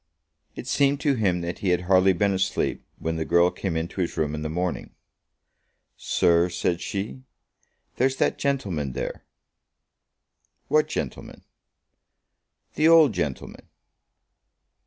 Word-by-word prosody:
It - - -7
seemed 140 0 +2
to 145 -3 +2
him 95 -8 0
that 85 0 -5
he 95 - -1
had 90 0 +2
hardly 95 +1 +4
been 100 +2 +1
asleep 95 0 -1
when 80 0 -3
the 80 - -1
girl 85 +2 +3
came 90 -4 -3
into 85 +4 -3
his 85 - -3
room 75 -2 0
in 75 - -4
the 75 - -3
morning. 90 +2 -3 1.0
"Sir," 85 +1 +2
said 85 0 -1
she, 105 +6 -4 0.8
"there's 130 +1 +2
that - - 0
gentleman 95 - -1
there." - - -5 1.5
"What - - +3
gentleman?" - - -6 1.3
"The 155 - +3
old 160 -7 +6
gentleman." 75 -8 -4
90 Hz, 130 wpm, -25 LUFS, 85-105 Hz, 1.5 s, old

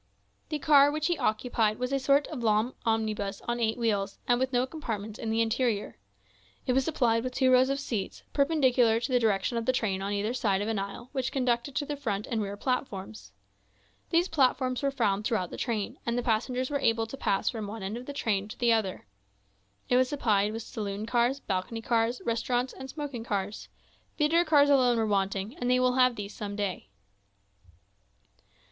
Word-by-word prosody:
The 305 - -1
car 290 -1 +6
which 305 +1 -2
he 345 -1 +1
occupied 215 -1 +1
was 250 +2 -2
a 275 - +2
sort 280 +2 +3
of 295 -6 -5
long 220 +2 +2
omnibus 215 -3 -1
on 240 0 -1
eight 220 0 0
wheels, 205 -4 -1
and 245 0 +3
with 260 0 0
no 250 0 +2
compartments 220 -8 -5
in 225 - -3
the 225 +1 +2
interior. 225 - -1 0.7
It 250 - +1
was 265 +1 +2
supplied 235 -7 +1
with 255 0 -4
two 260 -1 +3
rows 255 +1 +5
of 275 0 0
seats, 225 -8 -4
perpendicular 260 -6 +3
to 240 +3 -4
the 250 - +4
direction 220 +1 +1
of 230 - -3
the - - +5
train 205 -6 -1
on 200 +1 -2
either 205 +3 -1
side 205 -6 +1
of 205 - -2
an 220 -2 -1
aisle 200 +5 -6
which 265 -3 -2
conducted 255 0 0
to 290 - 0
the 290 - -3
front 210 -7 -3
and 225 -2 -2
rear 200 0 -4
platforms. 190 - -4 0.8
These 340 +2 +3
platforms 255 -4 +1
were 280 - +1
found 205 -7 0
throughout 210 -5 -1
the - - -6
train, 235 +2 -3
and 235 0 -1
the 245 - -1
passengers 250 +4 0
were 285 - 0
able 225 -3 +2
to 225 - -8
pass 195 -7 0
from 220 -4 -5
one 215 0 -7
end 195 +3 -3
of 245 +2 -8
the - - -4
train 205 -7 -1
to 215 - -9
the 235 -1 +3
other. 210 -5 -1 0.8
It 250 - +3
was 255 0 +3
supplied 210 -7 +1
with 225 0 -5
saloon 205 -1 -4
cars, 240 +3 +1
balcony 220 +2 -3
cars, 230 +1 0
restaurants, 245 +2 0
and 265 0 -9
smoking 285 -5 -5
cars; 205 -1 -3 0.5
theatre 330 +3 +3
cars 290 -2 +5
alone 250 -4 +4
were 225 - +1
wanting, 195 +2 -1
and 245 -7 -2
they 250 0 +4
will 255 0 +3
have 255 -1 +4
these 205 -1 -6
some 205 -1 -5
day. 200 - -3
235 Hz, 205 wpm, -28 LUFS, 210-260 Hz, 0.8 s, car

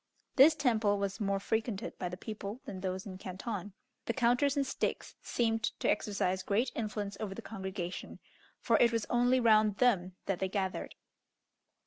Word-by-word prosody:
This 295 +4 +8
temple 225 -8 +2
was 200 +1 -2
more 200 -2 0
frequented 220 0 -2
by 180 - -2
the 180 - -6
people 210 +2 -6
than 190 - -6
those 185 0 -3
in 185 -2 -8
Canton. 195 +1 -5 0.3
The - - +1
counters 260 +3 +3
and 280 - +2
sticks - - -2
seemed 225 -2 0 0.2
to - - 0
exercise 190 -3 0
great 210 +7 +1
influence 210 -3 -3
over 200 -3 -4
the 230 - -6
congregation, 190 -3 -5 0.4
for - - +3
it 235 - +5
was 230 -2 0
only 245 +1 +4
round 215 -3 +5
them 190 -8 +2
that 195 -2 -1
they 190 - -1
gathered. 190 -1 -2
210 Hz, 165 wpm, -32 LUFS, 190-235 Hz, 0.4 s, This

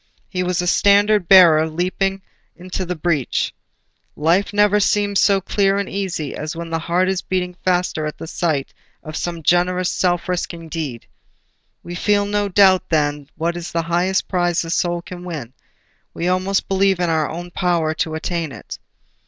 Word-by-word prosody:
He 180 - -3
was 180 -1 0
a - - -2
standard 205 +1 +3
bearer 165 -4 +7
leaping 190 +3 -1 0.3
into 185 0 -5
the 180 - -2
breach. 155 -5 -1 0.6
Life 170 +6 +1
never 210 0 +3
seems 205 0 +1
so 200 -1 +4
clear 195 +1 +1
and 200 -1 -2
easy 180 -7 -3
as 155 +2 -5
when 165 0 -6
the 165 - 0
heart 175 +3 +1
is 190 -1 0
beating 180 -1 -2
faster 180 -4 0
at 150 - -6
the - - -7
sight 155 -4 -2 0.3
of 155 0 -8
some 170 -1 -4
generous 180 +2 +2
self 175 -2 0
risking 170 -2 -4
deed. 145 -8 -5 0.8
We 175 - -7
feel 205 +3 +1
no 205 0 -1
doubt 190 -1 +4
then 145 -2 0
what 170 +1 -2
is 175 0 -6
the 165 0 -1
highest 175 +3 0
prize 175 -2 0
the 165 - -5
soul 175 0 0
can 180 0 -9
win; 150 -9 -6 0.6
we 170 - -2
almost 185 +2 0
believe 195 -1 +2
in 175 -2 +1
our 155 -2 +1
own 175 +2 -7
power 170 -4 0
to 160 0 -2
attain 165 -1 -3
it. - - -9
175 Hz, 175 wpm, -20 LUFS, 165-190 Hz, 0.8 s, bearer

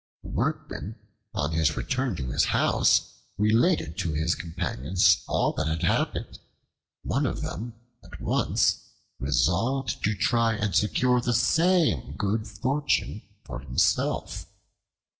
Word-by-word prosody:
The - - -9
Workman, 105 +3 -3 0.4
on 75 +2 -1
his 80 -2 +1
return 130 -5 -1
to 65 -5 -4
his - - +2
house, - - +2 0.2
related 110 - +2
to 85 -6 -1
his 80 +3 +1
companions 85 +1 +1
all - - +1
that 80 - -2
had 80 +2 -2
happened. 85 - -1 0.6
One - - 0
of - - -3
them 115 +5 -5 0.3
at - - -12
once - - +1 0.4
resolved 95 - 0
to 105 +1 +1
try 115 +3 +2
and 105 -2 -2
secure 125 +6 +2
the 120 0 0
same 135 - +2
good 105 +2 -1
fortune 130 +1 -1 0.2
for 60 -1 -6
himself. 65 -1 0
100 Hz, 125 wpm, -26 LUFS, 80-120 Hz, 0.6 s, his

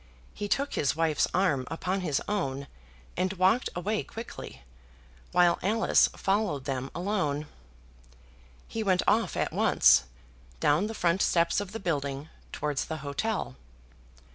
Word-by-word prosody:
He 205 - -4
took 280 +7 0
his 140 - +1
wife's 160 -2 +2
arm 150 -9 +1
upon 185 +4 -2
his 150 -6 -1
own, 140 -10 -2 0.5
and 185 +2 0
walked 190 +6 +2
away 205 +5 -1
quickly, 220 - -9 0.7
while 175 -1 +4
Alice 220 +4 +4
followed 195 -9 0
them 135 -1 -3
alone. 175 -6 -1 1.2
He 225 - -4
went 185 -4 +2
off 225 +2 +2
at - - -1
once, - - +5 0.5
down 155 +8 +3
the 225 - -6
front 175 0 +1
steps 170 +3 +2
of 200 -2 -7
the 225 - -5
building, 145 -4 -2 0.2
towards 145 -2 -2
the 160 - -4
hotel. 140 - -2
175 Hz, 135 wpm, -28 LUFS, 145-205 Hz, 1.2 s, once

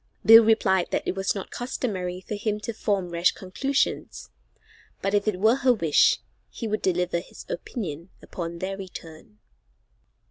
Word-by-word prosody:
Bill 225 +1 +10
replied 195 -5 +3
that - - -2
it - - 0
was 195 +1 -1
not 195 - -6
customary 190 -8 -3
for 200 - -7
him 210 0 -2
to 230 - -4
form 200 -4 -1
rash 170 +2 +2
conclusions, 270 +9 -2 0.7
but 195 - -2
if 205 +1 +1
it 195 -4 0
were 220 +5 +4
her 260 -2 +4
wish 165 -8 +4 0.3
he 230 - -6
would 215 0 -2
deliver 180 -1 0
his - - -12
opinion 185 - -5
upon 170 -1 -6
their 190 +2 -4
return. 160 - -10
195 Hz, 155 wpm, -25 LUFS, 180-220 Hz, 0.7 s, Bill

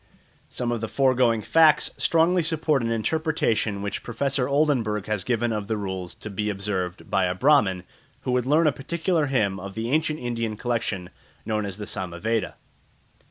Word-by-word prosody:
Some 120 -1 -3
of 120 -2 -2
the 115 - -2
foregoing 125 -4 +2
facts 155 +2 +5
strongly 170 +2 +3
support 155 -3 +1
an 115 - -1
interpretation 115 -5 0
which 100 - -3
Professor 130 +2 -1
Oldenberg 130 -8 +1
has 105 -3 -2
given 120 0 0
of 105 -2 -3
the 110 - -1
rules 95 -3 -5
to 105 - -8
be 105 +2 -2
observed 95 -3 -3
by 95 -2 +2
a 90 0 -1
Brahman 100 -7 +3 0.4
who - - -2
would 125 0 +1
learn 155 +4 +4
a 155 - +5
particular 165 +3 -1
hymn 105 -8 0
of 100 +1 -8
the 115 +2 -3
ancient 155 0 +1
Indian 115 -4 -3
collection 110 -7 -2 0.3
known 105 -2 -1
as 95 -1 -6
the 105 - -6
Samaveda. 95 +3 -2
115 Hz, 170 wpm, -25 LUFS, 100-140 Hz, 0.4 s, facts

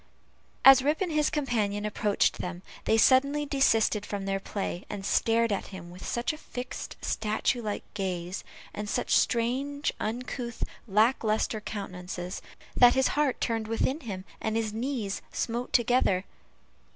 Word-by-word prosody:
As 270 -1 +10
Rip 295 +4 +1
and 365 -3 0
his 300 -1 +2
companion 215 -8 -1
approached 210 0 +1
them, 180 0 -5 0.2
they 220 - +3
suddenly 280 +5 +4
desisted 225 -7 +2
from 205 -1 -4
their 195 0 0
play, 195 -2 -4
and 200 -2 -5
stared 230 +2 +2
at 200 - -2
him 175 -3 -9
with 180 +1 -11
such 240 +7 -1
a 305 - -9
fixed 250 -3 -6
statue 220 +3 0
like 210 -2 -3
gaze, 185 -2 -3 0.3
and 210 0 -5
such - - +1
strange 265 +5 +1
uncouth, 240 +1 -4 0.2
lack 220 +6 +3
lustre 215 0 0
countenances, 180 -3 -5 0.3
that 245 0 +7
his 265 0 +3
heart 290 -3 +1
turned 225 -2 -1
within 245 +6 0
him, 195 - -6 0.2
and 220 0 -1
his 220 -2 -1
knees 225 -4 -2
smote 240 +2 -2
together. 230 -6 +3
225 Hz, 150 wpm, -28 LUFS, 200-255 Hz, 0.3 s, As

